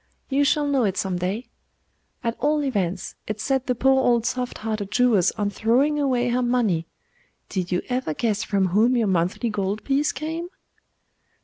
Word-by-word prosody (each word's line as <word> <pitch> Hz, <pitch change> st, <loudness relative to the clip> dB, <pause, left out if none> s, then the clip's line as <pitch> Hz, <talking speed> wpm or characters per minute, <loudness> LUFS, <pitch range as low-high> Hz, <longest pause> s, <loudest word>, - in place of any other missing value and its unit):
You 280 Hz, +1 st, +2 dB
shall 295 Hz, +1 st, +2 dB
know 280 Hz, -3 st, +2 dB
it 195 Hz, -3 st, 0 dB
some 185 Hz, -2 st, -1 dB
day. 195 Hz, +7 st, -2 dB, 0.8 s
At 230 Hz, 0 st, -1 dB
all 295 Hz, +3 st, +1 dB
events, 190 Hz, -8 st, -2 dB
it 215 Hz, 0 st, -4 dB
set 265 Hz, +1 st, 0 dB
the 250 Hz, -, +1 dB
poor 265 Hz, +2 st, +3 dB
old 235 Hz, -2 st, +3 dB
soft 250 Hz, 0 st, -2 dB
hearted 215 Hz, -2 st, -3 dB
Jewess 240 Hz, -7 st, +3 dB
on 205 Hz, -2 st, -2 dB
throwing 255 Hz, +9 st, +2 dB
away 250 Hz, -4 st, +1 dB
her 245 Hz, +1 st, +1 dB
money. 230 Hz, -10 st, +1 dB, 0.6 s
Did 185 Hz, -2 st, -3 dB
you 180 Hz, -, 0 dB
ever 250 Hz, -11 st, -2 dB
guess 215 Hz, -3 st, 0 dB
from 195 Hz, -2 st, +1 dB
whom 225 Hz, +7 st, +3 dB
your 230 Hz, -, +2 dB
monthly 190 Hz, +5 st, 0 dB
gold 205 Hz, 0 st, -2 dB
piece 280 Hz, +2 st, +1 dB
came? 320 Hz, +5 st, -4 dB
235 Hz, 175 wpm, -24 LUFS, 200-265 Hz, 0.8 s, poor